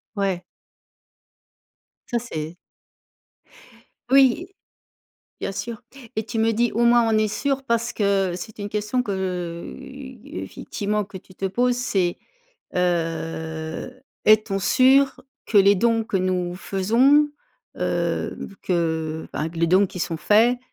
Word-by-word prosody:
Ouais. 190 -3 -1 1.6
Ça 235 - 0
c'est 165 -7 -6 1.5
Oui, 275 +6 +5 0.9
bien 195 - -2
sûr, 235 +4 -5 0.3
et 220 - 0
tu 225 +1 -4
me 225 +1 +3
dis: 235 +1 +1
«Au 235 +2 +2
moins 240 0 +6
on 220 - +3
est 215 0 +2
sûr» 275 +5 -1
parce 235 -2 0
que 195 -3 +1
c'était 205 +3 -8
une 205 - -3
question 210 +4 -1
que, 205 -4 -3
heu, 180 -3 -4 0.5
effectivement 210 - -3
que 195 0 -11
tu 185 0 -13
te 195 - -6
poses? 245 +5 +1
C'est, 190 -8 0 0.6
heu: 165 +4 -2 0.2
«Est-on 215 -2 +4
sûr 265 +6 +4 0.3
que 210 - +4
les 200 +1 +6
dons 230 +2 +2
que 205 - -1
nous 180 -1 -1
faisons, 250 +11 +3 0.5
heu, - - -1 0.3
que, 160 -3 -1
ben 155 - -2
que 165 0 -9
les 170 - +3
dons 190 +3 +5
qui 180 - -8
sont 165 -1 -2
faits, 225 +9 +4
205 Hz, 135 wpm, -23 LUFS, 180-235 Hz, 1.6 s, moins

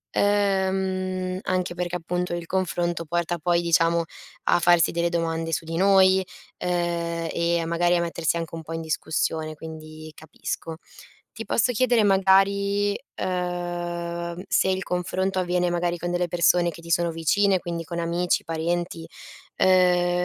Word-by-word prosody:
Ehm, 190 -2 0
anche 185 -1 -1
perché, 180 0 -3
appunto, 180 +1 -2
il 170 -1 -5
confronto 175 -2 -1
porta 170 +1 -1
poi, 175 +1 +2
diciamo, 170 0 +2 0.4
a - - +4
farsi 175 -2 +4
delle 170 0 0
domande 165 -1 -2
su 160 - -2
di 165 - -5
noi, 190 0 +5 0.4
uhm, 170 -1 -1
e 170 0 +1
a 165 - -2
magari 175 +1 +2
a 170 - +1
mettersi 170 -1 -1
anche 165 -1 -5
un 165 - -6
po' 165 - -7
in 165 - -3
discussione, 160 0 -2
quindi 155 0 -10
capisco. 160 +1 -6 0.6
Ti 225 0 -7
posso 235 +4 +2
chiedere 240 -1 +3
magari, 200 +1 +3 0.3
uhm, 175 -1 -3
se - - +2
il 190 0 0
confronto 185 +1 -1
avviene, 180 0 +1
magari, 175 0 -1
con 175 +1 -3
delle 175 0 0
persone 175 +1 +3
che 170 - -12
ti 170 - -7
sono 170 +1 +2
vicine, 190 +4 +2
quindi 170 -1 -4
con 170 +1 -6
amici, 170 +1 0
parenti, 165 0 -3 0.5
ehm 180 -1 +4
175 Hz, 150 wpm, -24 LUFS, 170-185 Hz, 0.6 s, noi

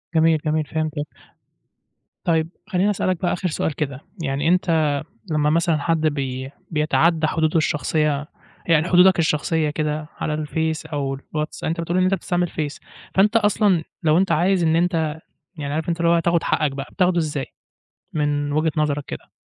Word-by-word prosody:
جميل، 160 0 +4
جميل، 155 0 +1
فهمتك. 155 -1 -2 1.2
طيب، 160 -1 +1 0.2
خلّيني 195 0 +1
أسألك 185 -3 0
بقى 175 - +1
آخر 180 +1 -2
سؤال 155 -2 -2
كده 140 -3 -3 0.2
يعني 140 +2 -1
أنت 165 -3 +3 0.4
لمّا 150 -1 +2
مثلًا 165 0 +2
حد 160 +2 0
بي 135 -2 -3 0.2
بيتعدّى 160 +1 +2
حدوده 160 +1 +1
الشخصية 150 -1 0 0.4
يعني 165 0 +3
حدودك 180 0 +6
الشخصية 155 0 +1
كده 150 0 -2
على 155 - -2
الفيس 160 +1 -2
أو 145 -3 -2 0.2
الواتس 150 0 -3
أنت 165 +1 -1
بتقول 170 +2 -1
إن 185 - +3
أنت 185 +1 +2
بتستعمل 175 -1 0
فيس، 150 -2 -4 0.4
فأنت 210 +4 +4
أصلًا 205 -5 +3 0.2
لو 155 0 +4
أنت 190 -1 +2
عايز 175 +3 +2
إن 160 -1 +3
أنت 165 -3 +1 0.4
يعني 145 -2 -4
عارف 160 +1 -2
أنت 170 0 -1
اللي 170 - +3
هو 170 - +4
تاخُد 170 0 +1
حقّك 150 -3 +1
بقى، 135 0 -5
بتاخدُه 180 -2 +2
إزاي 150 -4 -1 0.7
من 145 -1 0
وجهة 155 +2 +1
نظرك 145 -2 0
كده؟ - - -8
160 Hz, 165 wpm, -22 LUFS, 150-170 Hz, 1.2 s, حدودك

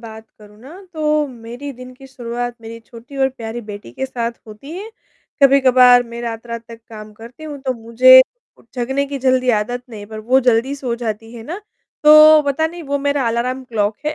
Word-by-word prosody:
बात 220 -1 -11
करूँ 210 0 -17
ना 270 +6 -13 0.2
तो 305 -2 0
मेरी 245 +3 -9
दिन 255 0 -12
की 270 +1 -15
शुरुआत 245 -1 -5
मेरी 230 0 -9
छोटी 235 +4 -14
और 265 -1 +2
प्यारी 235 -2 -7
बेटी 205 - -9
के 265 - -4
साथ 235 -2 -3
होती 215 +7 -12
है, 395 +6 -7 0.5
कभी-कभार 255 -2 +6
मैं 235 0 -8
रात-रात 230 0 -6
तक 230 0 -12
काम 215 -1 -11
करती 230 +8 -13
हूँ, 295 -2 -7
तो 260 -1 -1
मुझे 250 +3 +6 0.4
उ - - -21
जगने 265 +3 -1
की 280 0 -5
जल्दी 255 -1 +2
आदत 240 +3 -2
नहीं 210 -2 -9
पर 220 +1 -9
वो 250 +5 +2
जल्दी 245 +2 +1
सो 255 -4 -3
जाती 225 -1 -6
है 230 - -9
ना, 315 +10 -6 0.5
तो 305 0 +8
पता 285 +3 0
नहीं 340 +1 -9
वो 285 -1 -2
मेरा 280 -2 -1
अलार्म 250 +3 -2
क्लॉक 215 -3 -2
है 300 - -1
245 Hz, 200 wpm, -18 LUFS, 230-275 Hz, 0.5 s, तो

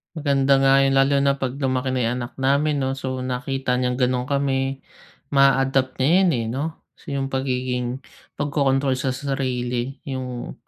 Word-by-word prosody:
Maganda 140 -3 +2
nga 135 0 +4
yun 135 - +2
lalo 140 +1 +3
na 140 - +4
'pag 130 -1 -2
lumaki 130 -1 -1
na 125 - +1
yung 115 +2 0
anak 120 0 -5
namin 140 +2 +1
'no, 130 - 0
so 130 -1 -3
nakita 130 0 -2
niyang 125 0 0
ganun 125 0 0
kami, 135 -1 -1 0.5
ma-a-adapt 135 -1 +3
niya 130 - +1
'yan, 190 -2 +4
eh, 115 - -2
'no. 135 +4 -2 0.4
So, 140 - -6
yung 135 0 -2
pagiging 130 -1 -2 0.3
pagkokontrol 140 -2 +1
sa 135 - -1
sarili 130 -2 -2
yung 130 -3 -5
135 Hz, 165 wpm, -22 LUFS, 125-135 Hz, 0.5 s, nga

